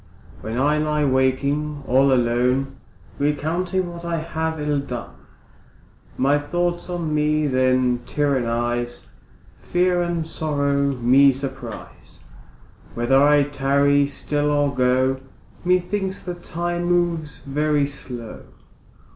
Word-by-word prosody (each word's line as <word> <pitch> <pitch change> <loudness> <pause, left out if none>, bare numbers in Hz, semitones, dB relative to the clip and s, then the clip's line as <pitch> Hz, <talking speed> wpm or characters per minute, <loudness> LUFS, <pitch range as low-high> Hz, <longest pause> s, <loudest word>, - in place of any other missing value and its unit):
When 110 +2 -5
I 150 +3 +2
lie 150 -1 +1
waking 140 +3 0
all 135 +2 +4
alone, 125 +2 +1 0.4
Recounting 170 +5 -1
what 170 0 -9
I 170 -1 -2
have 160 0 -3
ill 150 -1 0
done, 125 -4 -6 1.1
My 140 +3 +3
thoughts 175 +4 -2
on 170 -3 -2
me 150 0 +1
then 130 -2 +2
tyrannise, 120 -4 -1 0.5
Fear 180 0 +1
and 170 -2 -1
sorrow 140 -3 0
me 130 +3 +5
surprise, 130 -3 -8 0.7
Whether 130 +3 +3
I 145 0 +5
tarry 140 0 +2
still 145 +1 -2
or 145 -1 +1
go, 130 +1 +2 0.4
Methinks 185 +2 0
the 180 - -4
time 175 0 -3
moves 175 -3 0
very 150 +1 +1
slow. 125 -5 -8
145 Hz, 110 wpm, -22 LUFS, 130-160 Hz, 1.1 s, me